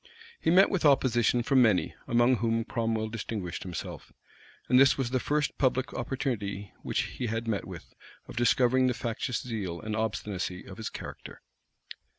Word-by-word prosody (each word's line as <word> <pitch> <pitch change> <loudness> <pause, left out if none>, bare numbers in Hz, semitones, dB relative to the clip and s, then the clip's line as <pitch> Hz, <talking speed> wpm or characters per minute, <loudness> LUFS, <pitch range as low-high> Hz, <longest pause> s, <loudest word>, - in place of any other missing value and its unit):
He - - 0
met 185 +4 +6
with 190 - 0
opposition 125 -4 +3
from 130 +1 +4
many, 110 -6 +3
among 120 +2 +4
whom 115 0 0
Cromwell 115 -2 -1
distinguished 105 -5 -4
himself; 90 -3 -7 0.6
and 125 +1 +5
this 135 -1 +6
was 130 -3 -1
the 130 - +1
first 150 +3 -1
public 130 -1 +1
opportunity 105 -7 -3
which - - -1
he 125 - -4
had 115 +1 -3
met 105 -3 -1
with, 90 -4 -10 0.3
of - - -10
discovering 125 +2 +3
the 125 - 0
factious 115 +1 -3
zeal 100 -8 -4
and 110 0 -4
obstinacy 105 -4 -3
of 95 -1 -10
his 110 - -4
character. - - -9
115 Hz, 160 wpm, -29 LUFS, 105-130 Hz, 0.6 s, met